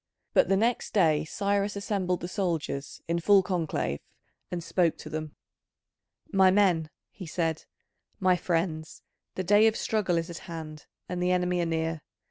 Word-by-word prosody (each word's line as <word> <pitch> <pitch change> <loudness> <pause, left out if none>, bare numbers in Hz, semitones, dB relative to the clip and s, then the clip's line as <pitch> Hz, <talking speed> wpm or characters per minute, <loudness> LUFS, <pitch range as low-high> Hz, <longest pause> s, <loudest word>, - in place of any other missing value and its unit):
But - - +4
the 195 - +4
next 230 +3 0
day 160 -6 +3
Cyrus 200 +3 -1
assembled 195 -3 -1
the 175 - -3
soldiers 165 -7 -3
in 170 +1 0
full 195 +2 +5
conclave, 165 - -1 0.5
and 175 -1 -4
spoke 170 -1 +1
to 155 - -9
them: 155 -1 -5 1.0
"My 190 -1 +6
men," 185 -5 +3 0.2
he 185 - -9
said, 160 -1 -2 0.5
"my 185 -1 +4
friends, 165 -2 -2 0.3
the 185 - -2
day 205 +4 +5
of 220 - +2
struggle 200 -6 0
is 165 +1 -2
at 170 - -7
hand, 155 -2 -7 0.2
and 180 0 -3
the 180 0 +2
enemy 180 0 +1
are 170 - 0
near. 160 -1 -1
175 Hz, 160 wpm, -28 LUFS, 160-195 Hz, 1.0 s, My